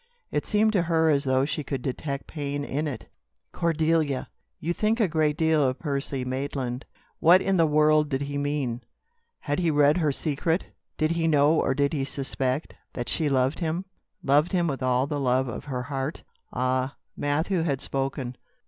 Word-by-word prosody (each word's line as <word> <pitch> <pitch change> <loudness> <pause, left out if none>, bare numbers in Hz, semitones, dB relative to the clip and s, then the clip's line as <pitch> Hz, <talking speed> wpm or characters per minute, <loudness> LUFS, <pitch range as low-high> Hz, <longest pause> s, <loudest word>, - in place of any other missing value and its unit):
It - - -1
seemed 215 0 +3
to 190 - +3
her 160 -1 +2
as 140 -1 +1
though 130 0 +2
she 150 +1 -3
could 135 -3 -4
detect 140 +1 -3
pain 145 -2 -4
in 150 +3 -2
it. 140 - -5 0.5
"Cordelia! 160 -4 +1 0.3
You 170 +3 -1
think 215 +5 +1
a 215 - +4
great 155 -2 +1
deal 160 -2 +3
of 130 0 +1
Percy 140 -3 -3
Maitland?" 130 -1 -3 0.3
What 175 +3 +7
in 195 0 +1
the 165 -2 +4
world 150 0 +4
did 135 -1 -1
he 140 0 -3
mean? 140 -4 -1 0.6
Had 145 +3 -1
he 170 -2 +2
read 145 +1 +4
her 155 -4 +2
secret? 160 +5 -1 0.3
Did 155 +1 +1
he 165 -1 +1
know 145 -1 +4
or 135 -4 +1
did 140 +1 +1
he 140 -3 0
suspect, 135 +1 -2 0.2
that 120 - -4
she 155 -3 +1
loved 130 +2 +1
him, 170 +2 -2 0.4
loved 150 +6 +3
him 175 -2 +2
with 140 -5 -2
all 130 0 +2
the 145 0 -3
love 130 0 +2
of 120 - -6
her 125 -3 -3
heart? 135 +2 -4 0.3
Ah! 130 +2 0 0.2
Matthew 160 +5 0
had 145 -5 0
spoken. 135 -2 -3
145 Hz, 185 wpm, -26 LUFS, 135-160 Hz, 0.6 s, What